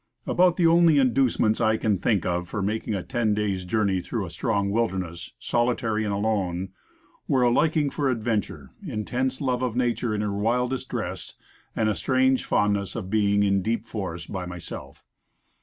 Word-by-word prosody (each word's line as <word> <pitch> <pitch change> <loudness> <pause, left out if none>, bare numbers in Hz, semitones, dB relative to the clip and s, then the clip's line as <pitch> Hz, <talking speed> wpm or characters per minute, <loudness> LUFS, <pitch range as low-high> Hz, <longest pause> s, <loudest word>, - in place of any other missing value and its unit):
ABOUT 180 -1 +3
the 175 - +3
only 165 -2 +5
inducements 125 -4 +2
I 110 -1 +3
can 105 -5 0
think 105 -2 +1
of 90 0 -1
for 105 0 -3
making 110 +1 -2
a 95 - -3
ten 115 -4 0
days' 100 -3 -1
journey 95 -1 +1
through 105 +2 -3
a 85 - -8
strange 100 -1 -1
wilderness, 95 -6 -2
solitary 120 -2 0
and 105 - -1
alone, 100 -3 -1 0.6
were 130 -2 +3
a 120 - +4
liking 150 +1 +2
for 140 -2 0
ad 115 -4 -2
venture, 110 -3 -2
intense 130 - -2
love 130 -2 0
of 125 -3 -1
nature 120 -2 0
in 105 - -1
her 105 -1 -1
wildest 125 +5 -1
dress, - - -5 0.4
and 110 - +1
a 110 - +2
strange 130 +1 +2
fondness 100 -1 +1
for 115 - -4
being 100 +1 +2
in 100 -1 +2
deep 115 +2 -1
forests 95 -7 -5
by 90 -2 -5
myself. 90 -2 -9
110 Hz, 175 wpm, -25 LUFS, 100-125 Hz, 0.6 s, only